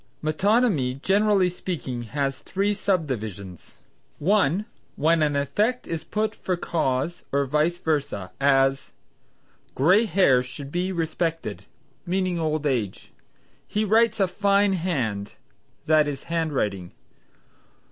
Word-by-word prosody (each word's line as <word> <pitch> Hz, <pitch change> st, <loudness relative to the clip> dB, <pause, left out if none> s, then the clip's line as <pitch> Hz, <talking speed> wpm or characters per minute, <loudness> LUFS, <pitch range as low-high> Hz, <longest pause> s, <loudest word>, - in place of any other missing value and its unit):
Metonymy, 155 Hz, -, +2 dB
generally 200 Hz, -1 st, +3 dB
speaking, 170 Hz, -8 st, -4 dB, 0.2 s
has, 135 Hz, -2 st, 0 dB
three 200 Hz, +2 st, -1 dB
subdivisions: 110 Hz, -, -3 dB, 0.4 s
(1) 190 Hz, +1 st, +2 dB, 0.3 s
when 160 Hz, +2 st, +2 dB
an 150 Hz, -1 st, +2 dB
effect 205 Hz, -, 0 dB
is 165 Hz, -1 st, -4 dB
put 215 Hz, 0 st, -1 dB
for 185 Hz, -4 st, -3 dB
cause 160 Hz, 0 st, -1 dB
or 140 Hz, 0 st, +1 dB
vice 150 Hz, +5 st, +1 dB
versa: 145 Hz, -, -2 dB
as 135 Hz, -1 st, +2 dB, 0.8 s
"Gray 185 Hz, -, +4 dB
hairs 140 Hz, -, +3 dB
should 135 Hz, +3 st, -8 dB
be 180 Hz, +3 st, -1 dB
respected," 165 Hz, -1 st, -2 dB, 0.4 s
meaning 185 Hz, -1 st, -1 dB
old 155 Hz, -1 st, -1 dB
age. 120 Hz, -9 st, -2 dB, 0.6 s
"He 210 Hz, +1 st, 0 dB
writes 220 Hz, +1 st, +3 dB
a 195 Hz, -, +3 dB
fine 200 Hz, +1 st, +2 dB
hand," 130 Hz, -, -2 dB, 0.5 s
that 155 Hz, -1 st, +4 dB
is, 140 Hz, -2 st, -4 dB
handwriting. 135 Hz, -, -2 dB
160 Hz, 115 wpm, -24 LUFS, 135-190 Hz, 0.8 s, Gray